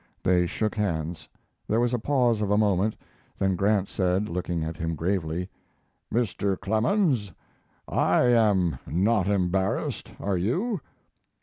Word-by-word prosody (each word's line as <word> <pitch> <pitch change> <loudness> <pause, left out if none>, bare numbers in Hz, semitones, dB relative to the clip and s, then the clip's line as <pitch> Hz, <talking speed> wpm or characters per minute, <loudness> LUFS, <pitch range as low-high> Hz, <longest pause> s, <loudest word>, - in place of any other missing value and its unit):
They 90 -1 +3
shook 110 +5 -1
hands; 85 -6 -3 0.4
there 110 - +1
was 120 0 +1
a 120 - +1
pause 120 -3 +2
of 105 - 0
a 105 - +3
moment, 105 0 +2 0.4
then 95 -1 +1
Grant 100 +1 +2
said, 95 +2 0
looking 85 -1 -2
at 80 +1 -4
him 80 +1 -3
gravely: 90 0 -1 0.6
"Mr. 100 -4 0
Clemens, 115 - +1 0.6
I - - +2
am 105 - +3
not 95 - +2
embarrassed, 95 -1 0
are 100 -2 -1
you?" 175 - -1
100 Hz, 130 wpm, -26 LUFS, 90-110 Hz, 0.6 s, They